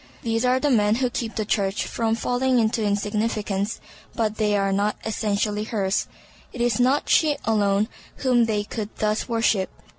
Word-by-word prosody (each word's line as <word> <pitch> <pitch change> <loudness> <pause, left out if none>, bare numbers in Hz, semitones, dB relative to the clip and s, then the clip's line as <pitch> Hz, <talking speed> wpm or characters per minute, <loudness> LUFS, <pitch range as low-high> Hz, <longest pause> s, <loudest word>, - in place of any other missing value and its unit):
These 225 0 0
are 250 +1 +3
the 290 +1 +1
men 210 -3 +3
who 250 0 0
keep 230 -2 -4
the 215 - -1
Church 200 -1 0
from 225 -1 -1
falling 250 +2 +1
into 225 -1 +1
insignificance, 205 0 -1 0.4
but 215 -2 -1
they 210 -1 +2
are 195 0 +1
not 205 +2 +1
essentially 210 -1 -1
hers. 200 -3 -1 0.4
It 250 - -9
is 240 -2 +1
not 260 +4 +2
she 305 -3 +3
alone 205 -1 +2 0.3
whom 250 -3 +2
they 210 -2 0
could 210 0 -5
thus 215 +3 -1
worship. 225 -4 +1
220 Hz, 170 wpm, -24 LUFS, 205-235 Hz, 0.4 s, are